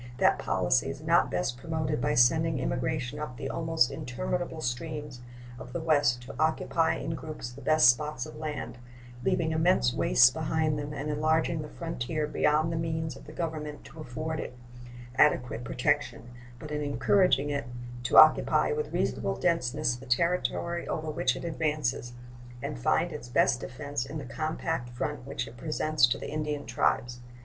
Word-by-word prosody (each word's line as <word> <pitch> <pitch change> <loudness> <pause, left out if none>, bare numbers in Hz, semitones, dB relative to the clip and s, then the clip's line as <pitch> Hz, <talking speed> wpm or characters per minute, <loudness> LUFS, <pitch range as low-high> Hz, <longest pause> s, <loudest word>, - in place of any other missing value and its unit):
That - - +3
policy - - +1
is - - -7
not - - +3
best 105 +7 -1
promoted 155 0 -2
by 150 0 +1
sending 160 +5 +4
emigration 130 +1 -2
up 140 -5 -6
the 135 - -4
almost 160 -6 +1
interminable 165 +7 -3
streams 145 0 -4 0.4
of - - -10
the - - -2
West 145 -7 +2
to 125 - -9
occupy 160 +1 +1
in 160 - -4
groups 155 -6 -6
the 130 +3 -12
best 155 -3 +5
spots 140 0 0
of 155 - -10
land, 145 -6 -5 0.4
leaving 160 +4 +1
immense 160 -6 +3
wastes 125 0 +5
behind 155 -1 0
them 145 0 -5
and 150 +1 -3
enlarging 155 +2 +1
the 150 - -7
frontier 155 -2 -3
beyond 150 +2 +2
the 165 - -2
means 160 -1 -2
of - - -13
the 150 - -10
Government 155 -2 -4
to 160 - -13
afford 155 +3 -4
it 125 - -6 0.6
adequate 125 -5 +3
protection, 125 0 -1 0.3
but 150 +3 -9
in 150 0 -2
encouraging 145 -1 +2
it 140 -4 -2 0.3
to 120 - +1
occupy 155 - +6
with 455 0 -2
reasonable - - -1
denseness 145 -5 0
the 130 +2 -12
territory 170 +4 0
over 155 -1 -3
which 130 -4 +1
it - - -7
advances, 150 -7 -1 0.5
and - - -5
find - - +1
its 120 - -8
best 120 0 +3
defense 145 -1 -4
in 140 +4 -6
the 145 - -6
compact 155 0 -3
front 125 +2 -4
which 140 - -3
it 115 +2 -12
presents 155 -2 +2
to 130 +3 0
the - - -7
Indian 150 -1 -3
tribes. 120 0 0
150 Hz, 170 wpm, -29 LUFS, 125-160 Hz, 0.6 s, occupy